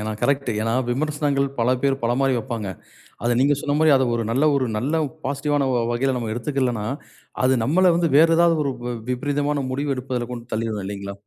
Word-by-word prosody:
ஏனா 110 +1 -3
கரெக்ட், 140 -2 +1
ஏனா 115 +1 0 0.2
விமர்சனங்கள் 145 +1 0
பல 115 +2 +2
பேர் 135 -1 +2
பல 120 +1 +1
மாரி 135 -1 +2
வைப்பாங்க. 115 -3 -4 0.6
அத 120 0 +2
நீங்க 145 +2 +4
சொன்ன 145 0 -1
மாரி 155 -1 +5
அதை 130 - +1
ஒரு, 115 - -1
நல்ல 140 +6 +3
ஒரு 130 - +1
நல்ல 130 +8 -2 0.3
பாசிட்டிவ் 145 +1 -1
ஆன 140 -2 +1
வ - - +1
வ 115 - 0
வகையில 130 +2 0
நம்ம 115 -3 -3
எடுத்துக்கலனா, 120 -2 -1 0.6
அது 130 +1 +4
நம்மல 175 +8 +4
வந்து 170 -1 +1
வேறு 165 +2 +6
ஏதாவது 170 -1 +4
ஒரு 140 - 0
வி 125 - -2
வி - - -5
விபரீதமான 145 +2 -1
முடிவு 140 +2 -1
எடுப்பதில 125 -2 -3
கொண்டு 120 -1 -7
தள்ளிரும் 110 -1 -2
இல்லைங்களா? 100 0 -5
135 Hz, 210 wpm, -22 LUFS, 120-145 Hz, 0.6 s, வேறு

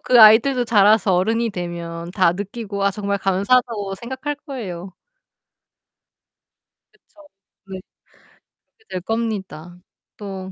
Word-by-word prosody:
그 245 -2 +4
아이들도 240 +4 +6
자라서 210 -3 +4
어른이 225 +5 +1
되면 170 -2 -6
다 185 -4 +3
느끼고 200 +1 -5
아 200 - +3
정말 200 0 -3
감사하다고 200 +1 0
생각할 260 +6 -5
거예요. 190 -9 -7 2.0
그쵸. 305 -1 -22 0.4
네. 190 -1 -7 1.0
그렇게 440 - -29
될 185 - -4
겁니다. 190 -6 -4 0.4
또 190 -2 -7
200 Hz, 240 characters per minute, -21 LUFS, 185-230 Hz, 2.0 s, 아이들도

